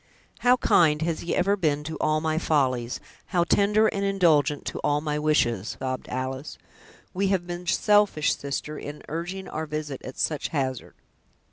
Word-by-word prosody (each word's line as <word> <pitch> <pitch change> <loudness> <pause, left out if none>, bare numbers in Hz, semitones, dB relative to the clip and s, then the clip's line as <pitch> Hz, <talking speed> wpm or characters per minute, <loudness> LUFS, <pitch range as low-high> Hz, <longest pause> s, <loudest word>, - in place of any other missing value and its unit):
"How 250 +1 +4
kind 160 -9 +3
has 165 -1 -1
he 170 - -2
ever 195 +3 +2
been 150 -6 0
to 160 +1 -5
all 155 0 +1
my 160 0 0
follies, 130 -7 0 0.3
how 175 -3 +2
tender 205 +4 +3
and 200 -2 0
indulgent 160 -8 +2
to - - -4
all 145 0 +1
my 150 -1 -2
wishes!" 120 -9 +1
sobbed 130 -1 -4
Alice. 130 +3 -4 0.6
"We 195 +2 0
have 190 -2 +1
been 175 0 -6
selfish, 205 -4 +3
sister, 145 +2 -4
in 145 +1 -8
urging 175 +4 -4
our 160 0 -4
visit 150 -3 -4
at 130 - -8
such 150 -3 0
hazard." 130 -5 -3
155 Hz, 165 wpm, -26 LUFS, 145-180 Hz, 0.6 s, How